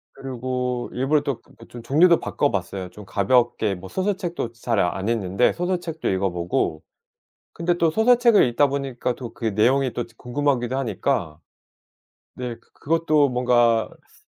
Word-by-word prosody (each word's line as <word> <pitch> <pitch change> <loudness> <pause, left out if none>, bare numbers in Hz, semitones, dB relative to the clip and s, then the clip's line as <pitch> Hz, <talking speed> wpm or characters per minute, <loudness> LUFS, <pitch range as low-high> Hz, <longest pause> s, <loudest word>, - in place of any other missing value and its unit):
그리고 125 -1 -3
일부러 140 +4 +1
또 140 -5 -3
그 - - -23
그 - - -15
좀 120 - -10
종류도 160 +8 +4
바꿔봤어요. 95 -7 -2
좀 105 +3 -12
가볍게 110 0 +1
뭐 90 +1 -10
소설책도 185 - -2
잘 115 -2 -1
안 95 +2 0
읽는데 105 -1 +1
소설책도 175 -2 -2
읽어 95 0 0
보고. 85 -2 -2 0.7
근데 175 +1 0
또 165 -2 +2
소설책을 235 +2 +5
읽다 140 +4 +3
보니까 135 -3 -2
또 120 -3 -8
그 115 - -7
내용이 130 +4 +2
또 120 - -2
궁금하기도 130 -1 -1
하니까 100 - -2 1.0
네 125 -2 -5
그 - - -30
그것도 155 -2 +2
뭔가 120 -2 +2 0.2
스 - - -27
125 Hz, 310 characters per minute, -23 LUFS, 115-150 Hz, 1.0 s, 소설책을